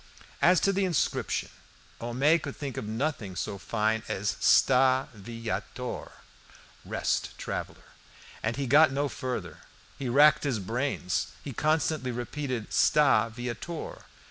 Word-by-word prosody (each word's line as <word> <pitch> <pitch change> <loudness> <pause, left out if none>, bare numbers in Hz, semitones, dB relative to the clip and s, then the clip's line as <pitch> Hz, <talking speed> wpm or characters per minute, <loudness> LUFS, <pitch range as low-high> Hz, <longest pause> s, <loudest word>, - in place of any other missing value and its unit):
As 180 0 +6
to 195 - +3
the 195 +1 +1
inscription, 175 -6 0 0.5
Homais 135 +8 +2
could - - -6
think 140 -4 -5
of - - -4
nothing 110 -4 -2
so 100 +3 -4
fine 110 +2 0
as 100 +2 -1
Sta 130 +1 +4
viator, 115 +3 -5 2.3
and 110 +1 0
he 140 - -2
got 145 +4 +6
no 140 +2 0
further; 130 -2 -5 0.4
he 135 -3 -2
racked 145 +5 +6
his 135 -6 0
brain, 120 +8 -2 0.4
he 140 - -6
constantly 155 -1 0
repeated 125 0 -4
Sta 145 -6 +4
viator. 120 +8 -6
130 Hz, 115 wpm, -28 LUFS, 115-150 Hz, 2.3 s, As